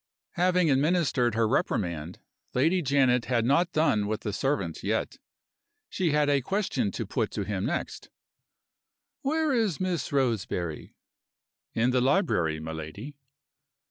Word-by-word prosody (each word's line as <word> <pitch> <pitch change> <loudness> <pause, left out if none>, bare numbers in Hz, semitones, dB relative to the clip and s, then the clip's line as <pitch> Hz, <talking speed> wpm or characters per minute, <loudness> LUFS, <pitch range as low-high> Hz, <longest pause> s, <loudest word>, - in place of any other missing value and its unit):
Having 180 -2 +2
administered 140 -5 +2
her 115 -1 +2
reprimand, 85 -6 -1 0.4
Lady 165 +8 +3
Janet 130 -4 +2
had 120 -3 +1
not 170 +7 +2
done 155 -11 +2
with 110 +1 -2
the 105 - -3
servant 105 - -1
yet. - - -2 0.7
She 180 -3 0
had 150 0 +2
a 140 -1 +3
question 200 - -1
to - - -3
put - - -1
to - - -2
him - - -2
next. - - -4 1.1
"Where 310 +1 +1
is 220 - +1
Miss 185 -3 -2
Roseberry?" 110 - -2 0.8
"In 120 +3 +2
the 125 0 +2
library, 125 - +1
my 80 +1 -6
lady." 80 - -7
135 Hz, 135 wpm, -27 LUFS, 105-170 Hz, 1.1 s, Lady